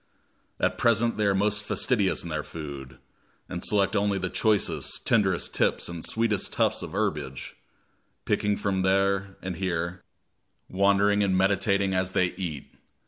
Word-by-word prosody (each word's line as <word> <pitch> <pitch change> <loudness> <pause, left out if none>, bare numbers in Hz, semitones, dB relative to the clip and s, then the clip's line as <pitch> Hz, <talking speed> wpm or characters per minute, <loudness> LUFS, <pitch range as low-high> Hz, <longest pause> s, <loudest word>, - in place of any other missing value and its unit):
At - - 0
present 115 0 +2
they 105 - +1
are 100 - +2
most 105 +2 +1
fastidious 105 -1 0
in 85 - -6
their 75 -1 -2
food, 70 -5 -8 0.5
and - - -5
select 100 +1 +2
only 100 -1 +1
the 95 -2 -3
choicest, 110 -3 0
tenderest - - +1
tips - - +1
and 85 -1 -6
sweetest 110 -3 0
tufts - - +1
of - - -7
herbage, 65 0 -3 0.7
picking 105 0 +1
them 95 -2 -1
here 95 0 +1
and 95 0 -3
there, 90 -1 -2 0.7
wandering 100 +2 +3
and 95 -2 +2
meditating 100 0 +2
as 95 0 -1
they 90 -1 +2
eat. 90 -7 -6
95 Hz, 145 wpm, -26 LUFS, 90-100 Hz, 0.7 s, wandering